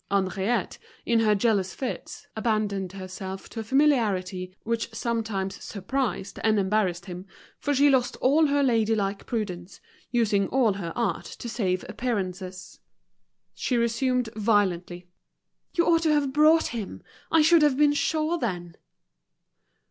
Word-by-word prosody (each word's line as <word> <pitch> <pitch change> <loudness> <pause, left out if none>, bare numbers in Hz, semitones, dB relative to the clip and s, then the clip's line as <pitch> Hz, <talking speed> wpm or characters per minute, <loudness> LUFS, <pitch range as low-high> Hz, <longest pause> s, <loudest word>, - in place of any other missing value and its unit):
Henriette, 195 +3 0 0.3
in 235 -1 +3
her 215 -2 +3
jealous 200 -3 +1
fits, 260 -2 -5
abandoned 210 -4 -1
herself 190 0 -7
to 230 - -7
a - - -3
familiarity 210 -9 +1
which 230 0 -2
sometimes 220 -5 -2
surprised 210 0 -3
and 220 -1 +3
embarrassed 190 -3 0
him, 180 0 -8 0.3
for 290 - -1
she 285 +2 +5
lost 260 -3 +2
all 300 +4 +4
her 285 0 +2
lady 225 -4 +2
like 200 -1 -2
prudence, 190 -6 -4 0.3
using 210 -5 +2
all 245 -6 +2
her 185 -4 -5
art 220 -8 -1
to - - -8
save 190 -6 -1
appearances. 185 -6 -4 0.7
She 250 - -1
resumed 235 +1 +1
violently, 190 -5 0 0.7
"You 340 - +3
ought 330 -1 +4
to 315 -2 +3
have 285 -3 +1
brought 310 +2 +5
him. 220 -5 -6 0.3
I 325 -1 +5
should 330 +1 +6
have 295 -3 +3
been 295 0 +4
sure 315 +3 0
then." 175 - -4
220 Hz, 140 wpm, -26 LUFS, 190-260 Hz, 0.7 s, should